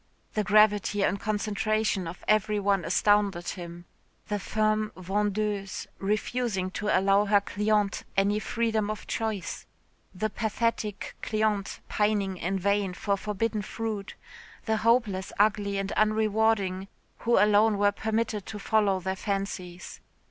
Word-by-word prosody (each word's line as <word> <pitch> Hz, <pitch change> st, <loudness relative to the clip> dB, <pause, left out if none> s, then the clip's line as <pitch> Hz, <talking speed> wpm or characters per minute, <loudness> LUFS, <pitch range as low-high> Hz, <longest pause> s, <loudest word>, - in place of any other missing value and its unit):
The 215 Hz, -, 0 dB
gravity 210 Hz, -1 st, +4 dB
and 200 Hz, -, +1 dB
concentration 215 Hz, -2 st, 0 dB
of 170 Hz, +2 st, -8 dB
every 215 Hz, 0 st, +2 dB
one 195 Hz, -2 st, +1 dB
astounded 200 Hz, 0 st, +2 dB
him 175 Hz, -1 st, -7 dB, 0.4 s
the 205 Hz, -1 st, -1 dB
firm 215 Hz, +1 st, 0 dB
vendeuse 205 Hz, +1 st, -2 dB
refusing 210 Hz, -1 st, -1 dB
to 210 Hz, -, -4 dB
allow 195 Hz, +1 st, +3 dB
her 205 Hz, 0 st, +4 dB
cliente 210 Hz, 0 st, 0 dB, 0.2 s
any 200 Hz, +2 st, +3 dB
freedom 220 Hz, -1 st, -1 dB
of 215 Hz, -, -5 dB
choice. 215 Hz, -5 st, -3 dB, 0.5 s
The 215 Hz, +3 st, -1 dB
pathetic 220 Hz, -2 st, -2 dB
cliente 215 Hz, -2 st, -1 dB
pining 205 Hz, -3 st, 0 dB
in 185 Hz, +3 st, -1 dB
vain 200 Hz, -1 st, 0 dB
for 200 Hz, +1 st, 0 dB
forbidden 210 Hz, +2 st, -2 dB
fruit 210 Hz, -1 st, -5 dB, 0.5 s
the 220 Hz, -1 st, +1 dB
hopelessly 215 Hz, -4 st, +1 dB
ugly 205 Hz, -1 st, +2 dB
and 195 Hz, 0 st, -2 dB
unrewarding, 215 Hz, -3 st, +1 dB, 0.3 s
who 235 Hz, 0 st, +2 dB
alone 210 Hz, +1 st, +4 dB
were 205 Hz, 0 st, +4 dB
permitted 220 Hz, -1 st, -2 dB
to 215 Hz, -, -6 dB
follow 205 Hz, -2 st, +2 dB
their 190 Hz, +1 st, -2 dB
fancies. 190 Hz, -3 st, -4 dB
205 Hz, 125 wpm, -27 LUFS, 195-215 Hz, 0.5 s, gravity